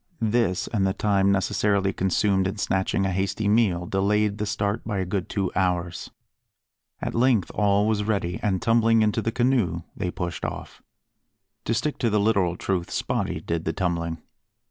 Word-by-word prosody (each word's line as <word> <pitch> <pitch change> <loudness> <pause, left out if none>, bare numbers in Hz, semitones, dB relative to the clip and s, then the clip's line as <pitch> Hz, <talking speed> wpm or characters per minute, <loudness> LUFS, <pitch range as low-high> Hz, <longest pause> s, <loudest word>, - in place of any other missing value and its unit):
This, 110 -4 +1
and 100 -3 +2
the 95 - 0
time 100 -1 +2
necessarily 100 0 +1
consumed 95 +1 +1
in 100 +3 -4
snatching 95 0 0
a 95 - 0
hasty 95 +3 -1
meal, 100 -5 +2
delayed 105 +3 +1
the 105 - -1
start 105 -1 -1
by 105 -3 -3
a 95 - -1
good 95 0 -3
two 95 -3 -1
hours. 90 -2 -1 0.9
At - - -2
length 115 -5 +2
all 100 0 +2
was 105 -1 +1
ready, 100 -4 -1
and 95 -3 0
tumbling 115 -1 +4
into 105 -1 +1
the 115 - -1
canoe 115 -9 +1
they 90 -3 -2
pushed 90 -2 -5
off. - - -6 0.8
To 115 - 0
stick 150 +5 -2
to 120 - +1
the 105 0 +2
literal 100 -5 +2
truth, 90 -3 -2
Spottie - - -2
did 85 -1 -2
the 80 - -2
tumbling. 85 -3 -2
100 Hz, 170 wpm, -25 LUFS, 95-105 Hz, 0.9 s, tumbling